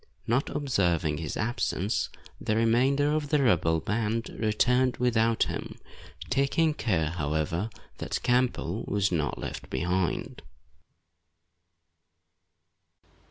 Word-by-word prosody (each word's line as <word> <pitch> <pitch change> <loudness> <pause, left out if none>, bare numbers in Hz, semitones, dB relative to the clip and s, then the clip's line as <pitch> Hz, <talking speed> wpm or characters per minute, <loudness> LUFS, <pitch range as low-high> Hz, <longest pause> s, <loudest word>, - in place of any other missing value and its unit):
Not 125 +5 +1
observing 90 - 0
his 80 -3 -4
absence, 105 -2 -1 0.3
the 110 - -1
remainder 130 +6 +3
of 150 -2 -1
the 150 -2 +3
rebel 80 -8 +3
band 110 +4 -1
returned 125 +3 +1
without 115 -2 +2
him, - - -5 0.5
taking 150 +3 +2
care, 85 - 0
however, 80 +4 -1 0.3
that - - -3
Campbell 125 -6 +1
was 100 -1 +1
not 75 -5 -1
left - - -6
behind. 90 +5 -1
110 Hz, 100 wpm, -28 LUFS, 85-125 Hz, 0.5 s, remainder